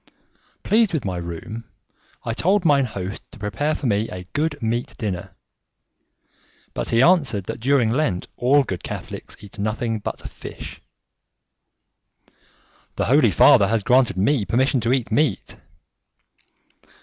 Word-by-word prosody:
Pleased 215 -3 +3
with 150 -9 -1
my 90 -2 -2
room, 85 +7 -6 0.6
I 115 - -2
told 185 - +1
mine 140 -4 +4
host 100 -3 -6
to - - -13
prepare 110 +9 -1
for 145 - -6
me 110 -1 +1
a 90 0 -7
good 150 0 -1
meat 120 +1 -2
dinner; 95 -4 -4 1.4
but - - -3
he 115 +2 +4
answered 140 - +3
that - - -6
during 125 -2 +2
Lent 115 -9 0
all 140 +3 +3
good 95 -8 -5
Catholics - - -7
eat 100 0 -13
nothing 110 +2 -1
but - - -6
fish. - - -10 2.1
"The - - -1
Holy - - +4
Father 100 - +6
has 110 -1 0
granted 125 -5 +3
me 110 +5 +2
permission 130 +5 +1
to 115 +2 0
eat 130 -4 0
meat." 135 -3 0
115 Hz, 135 wpm, -22 LUFS, 100-140 Hz, 2.1 s, Father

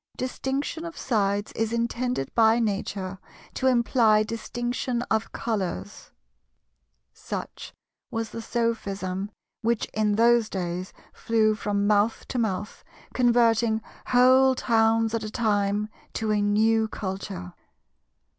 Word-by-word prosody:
"Distinction 270 +5 -3
of 335 -1 -7
sides 205 -3 0
is 225 0 -2
intended 235 - -2
by 225 0 +5
Nature 195 -3 -2 0.3
to 260 - 0
imply 235 -3 +4
distinction 240 +2 -3
of 220 0 0
colours"—such 185 - -4 2.0
was 225 0 -3
the 230 - -6
sophism 200 -5 -2 0.3
which 230 -1 +1
in 210 -1 +1
those 235 0 +4
days 180 0 -4 0.2
flew 220 -1 +2
from 205 -1 -1
mouth 210 +2 +2
to 255 - -2
mouth, 210 -2 -3 0.3
converting 235 -2 +3 0.3
whole 260 +1 +5
towns 225 -2 +2
at 230 - 0
a 215 - -4
time 210 -2 0 0.3
to 220 -1 -1
a 210 -1 +2
new 220 +2 +3
culture. 190 -3 -6
220 Hz, 110 wpm, -26 LUFS, 205-235 Hz, 2.0 s, by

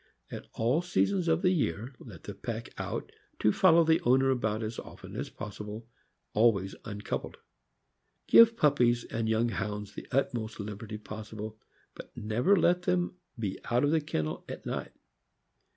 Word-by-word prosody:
At - - -7
all 120 +8 +2
seasons 180 +1 +1
of 165 +1 +2
the 180 - +5
year, 125 - -1
let 95 -9 -12
the - - -6
pack - - -5
out - - -4 0.3
to 105 - +3
follow 170 - +6
the 160 0 +3
owner 135 +2 +4
about 110 -3 0
as 110 +1 -4
often - - -10
as - - -3
possible, 105 +2 -7 0.5
always 105 -4 +3
uncoupled. 105 -2 -4 0.9
Give 230 0 +7
pup 145 -5 +3
pies 120 -1 +3
and 115 -1 -2
young 110 +2 +2
Hounds 105 -1 -4
the - - -8
utmost 120 -5 -1
liberty 105 +1 -6
possible, 110 0 -7 0.3
but - - -12
never 115 - +2
let 180 -1 +3
them 180 0 0 0.2
be 100 -5 -3
out 120 +3 +3
of 145 - +3
the 160 -1 +3
kennel 80 - -3
at - - -7
night. - - -4
115 Hz, 160 wpm, -30 LUFS, 105-155 Hz, 0.9 s, Give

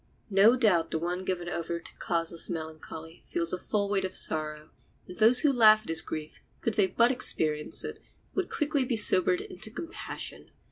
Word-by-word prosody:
No 200 +5 +5
doubt 205 -10 +2
the - - -2
one 175 +3 -4
given 180 -2 -4
over 170 0 -4
to - - -11
causeless 165 0 -2
melancholy 160 0 -8
feels 170 0 -2
a - - 0
full 205 +1 -2
weight 200 -1 -1
of 185 0 -4
sorrow, 155 -1 -1 0.4
and 180 - -11
those 230 +3 +7
who 295 -3 +2
laugh 215 -3 +5
at - - -13
his 165 0 +3
grief, 155 -1 -7 0.2
could 230 - -2
they 200 -2 +2
but 235 +6 +2
experience 155 -11 +1
it, - - -7 0.3
would 380 -2 -2
quickly 295 -2 -1
be 245 -2 -1
sobered 185 -3 +5
into 215 +4 -9
compassion. 250 +9 -6
185 Hz, 185 wpm, -28 LUFS, 165-220 Hz, 0.4 s, those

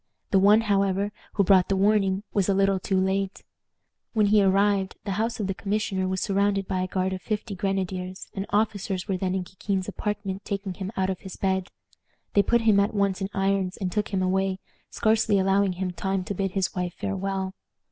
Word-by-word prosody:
The 195 - +5
one, 205 +3 +6
however, 200 -1 +1 0.2
who 200 - +3
brought 190 -1 +4
the 195 - +2
warning 195 -1 +2
was 200 -2 +1
a 195 - +3
little 195 0 +3
too 190 +1 0
late. 190 +1 -1 0.7
When 215 -3 +3
he 205 +1 +5
arrived 195 0 +2
the 205 - -3
house 230 +1 -2
of 210 - -1
the 195 - -1
commissioner 200 -1 -1
was 190 0 -1
surrounded 200 -1 +1
by 185 -1 -1
a 185 - -1
guard 185 0 -1
of 185 - -5
fifty 215 -1 -3
grenadiers, 185 -1 -3
and 195 0 -4
officers 205 -3 0
were 195 -2 0
then 185 0 -1
in 190 - -1
Kikin's 190 +1 -3
apartment 205 -1 -3
taking 195 -1 -3
him 190 +1 -5
out 190 0 +1
of 185 - -5
his 190 -2 -9
bed. 190 -1 -1 0.6
They 200 - +6
put 235 +3 +2
him 215 -3 +4
at 205 +2 +1
once 200 -1 +1
in 190 - -2
irons 195 -1 0
and 185 -3 -2
took 210 +1 0
him 190 -2 -1
away, 190 0 +1 0.3
scarcely 220 -2 +2
allowing 195 0 +2
him 185 0 -3
time 190 +1 -2
to 200 - -4
bid 195 -1 -2
his 190 -2 0
wife 180 -1 -3
farewell. 195 -1 -3
195 Hz, 205 wpm, -26 LUFS, 190-200 Hz, 0.7 s, one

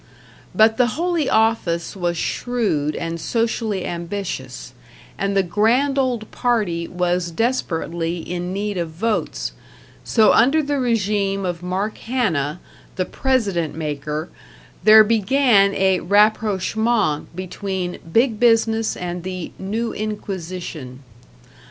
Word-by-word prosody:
But 220 0 +5
the 250 - +4
Holy 340 -4 0
Office 220 -6 +1
was 175 -2 -1
shrewd 195 -12 -1
and 165 0 -4
socially 225 -1 -1
ambitious, 175 +3 -5 0.4
and 195 0 -1
the 195 - +4
Grand 235 +10 +2
Old 245 -5 -1
Party 205 -9 0
was 180 0 -1
desperately 170 -5 -1
in 175 +1 -4
need 200 0 -2
of 170 -1 -2
votes, 210 +7 -2 0.5
so 220 -2 +4
under 275 +7 +4
the 285 0 -1
regime 205 -5 0
of 175 -2 -3
Mark 190 +4 -3
Hanna, 175 - -1 0.4
the 185 - -1
President 200 - 0
Maker, 150 0 -4 0.5
there 215 0 +9
began 220 -2 +3
a 190 -1 +2
rapprochement 210 -3 +2
between 185 0 -4
Big 230 +1 +2
Business 225 -2 +2
and 180 0 -4
the 185 -1 -5
New 220 +5 -2
Inquisition. 180 -10 -6
200 Hz, 115 wpm, -21 LUFS, 175-225 Hz, 0.5 s, there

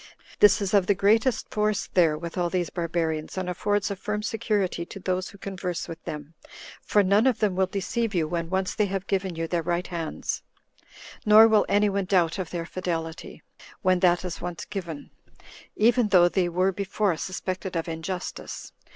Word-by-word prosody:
This 205 0 +6
is 195 - -3
of 195 -3 +4
the 205 - +3
greatest 220 +6 +2
force 210 -1 +1
there 165 -4 +4
with 170 +1 -7
all 175 -1 0
these 180 -1 -1
barbarians, 165 -2 -2
and 185 -1 -2
affords 205 +3 0
a - - -2
firm 210 +2 -3
security 210 -6 -1
to 195 - -9
those 185 0 -2
who 200 - -14
converse 185 -3 -4
with 165 0 -9
them; 150 +1 -7 0.5
for 205 - +3
none 200 +6 +4
of 250 -4 +2
them 210 -4 +1
will 190 0 +2
deceive 205 +3 -2
you 160 -3 +1
when 170 0 -3
once 190 0 -1
they 210 -2 +1
have 195 0 -3
given 190 -3 -1
you 165 0 -2
their 170 0 0
right 175 +2 -1
hands, 165 -3 -4 0.8
nor 215 +1 +8
will 220 -2 +3
any 205 +1 +4
one 200 -1 -1
doubt 180 -1 +2
of 180 -3 -3
their 170 -2 -4
fidelity, 165 -2 -5 0.4
when 185 -1 +3
that 175 0 +3
is 180 - -5
once 175 -3 -5
given, 170 -7 -6 0.6
even 235 +1 +3
though 180 -4 +6
they 175 0 +1
were 185 +3 +2
before 200 0 -1
suspected 185 +2 -4
of 165 +1 -1
injustice. 165 +3 -5
185 Hz, 185 wpm, -26 LUFS, 170-200 Hz, 0.8 s, nor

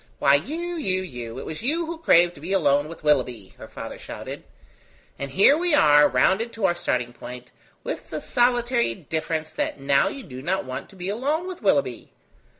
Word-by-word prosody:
"Why, 140 - +4
you, 330 - -1
you, 185 - -1
you, 120 -8 -7
it - - -6
was 155 - -6
you 320 +8 0
who 330 0 -6
craved 175 - +4
to 140 - -15
be 180 +5 -3
alone 145 -5 +3
with 165 0 -11
Willoughby!" 125 -9 0
her - - -9
father - - -8
shouted; - - -8 0.8
"and 140 - -4
here 195 - +5
we 340 -1 +2
are 150 - +6
rounded 190 - +2
to 220 -3 -1
our 175 - +3
starting 125 -8 -2
point, 125 +1 -10 0.3
with - - -5
the - - -4
solitary 240 - +1
difference 160 +2 -3
that - - -2
now 140 0 +3
you 275 - -5
do 130 - -9
not 185 +4 -1
want 130 0 -6
to 195 - -17
be 180 -1 -6
alone 285 - -1
with 370 -1 -7
Willoughby. - - +1
175 Hz, 195 wpm, -24 LUFS, -, 0.8 s, are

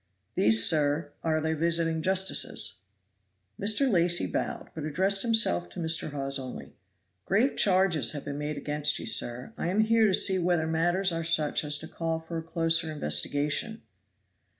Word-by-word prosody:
"These, 110 +1 +3
sir, 145 -1 +1
are 155 -1 0
the 160 +1 -2
visiting 165 0 0
justices." 190 - 0 0.8
Mr. 215 +7 +2
Lacy 175 - +2
bowed, 90 - -4
but 160 - -7
addressed 190 +6 +1
himself 220 - +2
to - - -10
Mr. 160 -1 +1
Hawes 140 -1 -3
only. 130 -1 -9 0.5
"Grave 225 +8 +1
charges 185 -6 +2
have 145 - -7
been 145 0 -5
made 150 0 -4
against 150 +1 0
you, - - -7
sir. 120 +2 -1
I - - -2
am 195 +5 +1
here 225 0 +3
to 195 - +1
see 190 -2 +4
whether 175 -2 0
matters 175 +4 0
are 165 0 -3
such 160 -3 +1
as 150 0 +2
to 160 - -7
call 165 -1 -4
for 165 0 -6
a - - -6
closer 165 0 0
investigation." 145 - 0
160 Hz, 165 wpm, -27 LUFS, 145-185 Hz, 0.8 s, see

